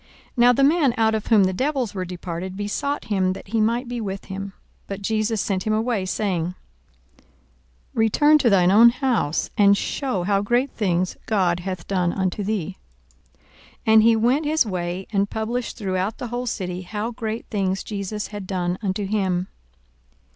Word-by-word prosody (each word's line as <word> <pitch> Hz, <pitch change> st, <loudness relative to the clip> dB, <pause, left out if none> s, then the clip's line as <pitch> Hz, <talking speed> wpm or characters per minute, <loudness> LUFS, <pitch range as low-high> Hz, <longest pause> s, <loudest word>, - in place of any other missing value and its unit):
42:008:038 -, -, -37 dB
Now 245 Hz, +1 st, +6 dB
the 275 Hz, -, +2 dB
man 290 Hz, -3 st, +4 dB
out 220 Hz, -1 st, +3 dB
of 215 Hz, -1 st, -2 dB
whom 215 Hz, -4 st, +5 dB
the 185 Hz, 0 st, +1 dB
devils 260 Hz, 0 st, -1 dB
were 185 Hz, -2 st, -3 dB
departed 180 Hz, +1 st, -6 dB
besought 210 Hz, +8 st, -2 dB
him 190 Hz, -3 st, +1 dB
that 190 Hz, -, -11 dB
he 225 Hz, +1 st, +1 dB
might 235 Hz, +4 st, +1 dB
be 240 Hz, -1 st, -4 dB
with 195 Hz, -2 st, -5 dB
him: 195 Hz, 0 st, -6 dB, 0.3 s
but 200 Hz, 0 st, -6 dB
Jesus 215 Hz, +1 st, 0 dB
sent 190 Hz, 0 st, -1 dB
him 215 Hz, -, +2 dB
away, 220 Hz, -3 st, 0 dB
saying, 180 Hz, -4 st, -1 dB, 0.6 s
42:008:039 -, -, -29 dB, 0.7 s
Return 295 Hz, +7 st, +4 dB
to 250 Hz, -, +3 dB
thine 185 Hz, -3 st, +4 dB
own 230 Hz, +4 st, +8 dB
house, 240 Hz, -, 0 dB
and 200 Hz, 0 st, +6 dB
shew 255 Hz, -9 st, -2 dB
how 200 Hz, +1 st, +1 dB
great 240 Hz, +6 st, +1 dB
things 185 Hz, -3 st, -1 dB
God 185 Hz, -5 st, +1 dB
hath 185 Hz, +1 st, -5 dB
done 180 Hz, -3 st, 0 dB
unto 190 Hz, +1 st, -1 dB
thee. 195 Hz, -3 st, -3 dB, 1.1 s
And 220 Hz, -1 st, +6 dB
he 230 Hz, +1 st, +5 dB
went 250 Hz, +7 st, +2 dB
his 310 Hz, -3 st, +3 dB
way, 180 Hz, -1 st, -3 dB
and 200 Hz, 0 st, +1 dB
published 230 Hz, +3 st, -3 dB
throughout 190 Hz, 0 st, -2 dB
the 250 Hz, -3 st, -5 dB
whole 245 Hz, +1 st, -3 dB
city 180 Hz, -5 st, -3 dB
how 210 Hz, +5 st, -4 dB
great 225 Hz, 0 st, -4 dB
things 195 Hz, -3 st, -1 dB
Jesus 205 Hz, 0 st, -4 dB
had 205 Hz, -3 st, -7 dB
done 180 Hz, -1 st, -2 dB
unto 200 Hz, 0 st, -2 dB
him. 190 Hz, -3 st, -1 dB
205 Hz, 175 wpm, -23 LUFS, 185-230 Hz, 1.1 s, own